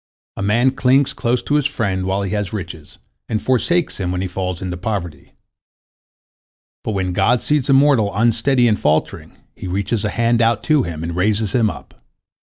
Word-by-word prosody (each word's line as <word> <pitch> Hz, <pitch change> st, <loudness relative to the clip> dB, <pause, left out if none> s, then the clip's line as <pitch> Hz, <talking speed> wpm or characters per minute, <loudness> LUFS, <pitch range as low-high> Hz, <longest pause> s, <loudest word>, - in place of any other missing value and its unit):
A -, -, -6 dB
man 115 Hz, +6 st, +2 dB
clings 135 Hz, +1 st, +2 dB
close 120 Hz, +1 st, -1 dB
to -, -, -2 dB
his 150 Hz, -1 st, +3 dB
friend 100 Hz, -9 st, -2 dB
while 95 Hz, +1 st, -1 dB
he 95 Hz, -, -3 dB
has 105 Hz, -2 st, -2 dB
riches, 85 Hz, -7 st, -8 dB, 0.3 s
and 110 Hz, -, 0 dB
forsakes 150 Hz, +8 st, 0 dB
him 90 Hz, -2 st, -2 dB
when 90 Hz, 0 st, -2 dB
he 95 Hz, -, -2 dB
falls 90 Hz, -1 st, -4 dB
into 90 Hz, -1 st, -4 dB
poverty. 90 Hz, -6 st, -5 dB, 1.5 s
But 110 Hz, -, -3 dB
when 95 Hz, -2 st, -2 dB
God 120 Hz, +7 st, +2 dB
sees 145 Hz, 0 st, 0 dB
a -, -, +5 dB
mortal 135 Hz, -6 st, +4 dB
unsteady 120 Hz, +3 st, +2 dB
and 105 Hz, -2 st, +1 dB
faltering, 75 Hz, +1 st, -1 dB, 0.2 s
He -, -, -7 dB
reaches 100 Hz, +4 st, -2 dB
a 105 Hz, -, 0 dB
hand 115 Hz, +2 st, +1 dB
out 115 Hz, -1 st, +2 dB
to 155 Hz, -2 st, +3 dB
him, 85 Hz, -7 st, -5 dB
and 85 Hz, 0 st, -4 dB
raises 105 Hz, +2 st, 0 dB
him 115 Hz, -4 st, +2 dB
up. -, -, -11 dB
105 Hz, 185 wpm, -19 LUFS, 95-125 Hz, 1.5 s, a